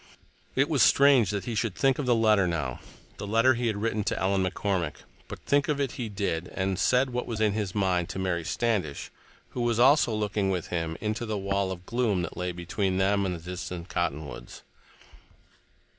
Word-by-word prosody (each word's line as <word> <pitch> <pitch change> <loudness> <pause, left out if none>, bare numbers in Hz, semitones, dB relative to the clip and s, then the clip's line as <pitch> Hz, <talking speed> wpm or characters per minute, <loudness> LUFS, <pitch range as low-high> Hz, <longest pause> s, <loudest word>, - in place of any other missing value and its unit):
It 135 +2 +3
was 150 -6 +1
strange 135 -7 +5
that 100 -1 -3
he 120 - -3
should 110 -3 -1
think 135 -1 +2
of 140 - -2
the 120 - +4
letter 110 -4 +4
now—the 75 +5 -6
letter 115 +5 +4
he 120 0 -1
had 110 -2 -1
written 110 0 -1
to - - -1
Ellen 95 0 +1
McCormick—but 95 -4 -4
think 145 0 +1
of 150 -2 0
it 140 -3 0
he 120 -3 -5
did, 95 -4 -2
and 95 0 -1
said 130 +5 +2
what 125 0 -3
was 115 -2 -4
in 105 -2 +2
his 105 -3 -3
mind 90 -4 +1
to - - -5
Mary 90 -3 -1
Standish, 100 -7 -2 0.4
who 125 - -4
was 120 -1 +1
also 135 0 +5
looking 105 -2 -1
with 90 -3 -2
him 80 -2 -2
into 110 +2 -2
the 110 -1 -2
wall 100 -1 -1
of 90 -1 -7
gloom 115 -6 0
that 85 - -6
lay 90 0 -2
between 95 +2 -2
them 100 +1 +2
and 90 - -2
the 85 +2 -8
distant 90 -1 -6
cottonwoods. 80 -4 -4
100 Hz, 195 wpm, -27 LUFS, 90-115 Hz, 0.4 s, strange